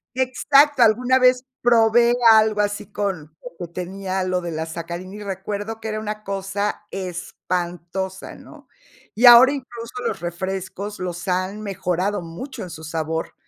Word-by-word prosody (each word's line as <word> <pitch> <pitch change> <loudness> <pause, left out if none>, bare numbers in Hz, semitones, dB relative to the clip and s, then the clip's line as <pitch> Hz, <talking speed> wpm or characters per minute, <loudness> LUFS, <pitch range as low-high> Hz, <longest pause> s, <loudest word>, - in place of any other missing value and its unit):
Exacto, 275 +2 +3
alguna 250 +4 +4
vez 255 0 +4 0.2
probé 235 0 +4 0.2
algo 215 -1 +4
así 205 0 -2
con 180 -7 -4
lo - - -10
que 170 - -27
tenía 190 +1 -3
lo 185 0 -1
de 170 -1 -5
la 160 0 -3
sacarina, 170 +3 -7
y 210 - -8
recuerdo 205 +3 -5
que 220 - -5
era 215 0 -3
una 215 0 -5
cosa 200 +2 -3
espantosa, 180 0 -4
¿no? - - -15 0.5
Y 240 - +3
ahora 245 +2 +10
incluso 240 -4 -7
los 195 - -3
refrescos 190 +3 -5
los 180 0 -5
han 185 +3 -1
mejorado 195 0 -2
mucho 175 +12 -8
en 180 - -8
su 160 -1 -9
sabor, 160 0 -3
195 Hz, 150 wpm, -22 LUFS, 180-225 Hz, 0.5 s, ahora